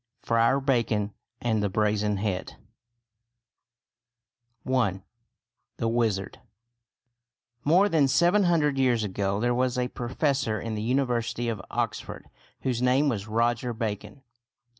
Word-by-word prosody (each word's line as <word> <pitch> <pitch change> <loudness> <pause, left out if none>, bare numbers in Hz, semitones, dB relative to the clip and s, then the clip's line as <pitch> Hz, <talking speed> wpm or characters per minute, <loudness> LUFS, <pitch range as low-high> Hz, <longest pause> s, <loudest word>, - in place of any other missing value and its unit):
FRIAR 115 +4 +3
BACON 115 -6 0 0.3
AND 110 -3 +1
THE 100 - 0
BRAZEN 105 0 +1
HEAD 95 -2 -3 2.1
I. 115 -8 +1 0.8
THE 115 - -1
WIZARD 115 -4 -1 1.2
More 180 +7 +5
than 160 -7 +3
seven 175 +8 +3
hundred 150 -5 +2
years 125 -4 +2
ago 100 0 -1
there 120 +2 +1
was 125 0 0
a 125 0 0
professor 125 -2 -1
in 115 -1 -4
the 105 - -3
University 120 -1 0
of 110 -4 -3
Oxford - - -4 0.3
whose 125 -2 -1
name 130 +4 +3
was 105 -5 -3
Roger 120 +2 0
Bacon. 110 +1 -5
120 Hz, 120 wpm, -27 LUFS, 105-130 Hz, 2.1 s, More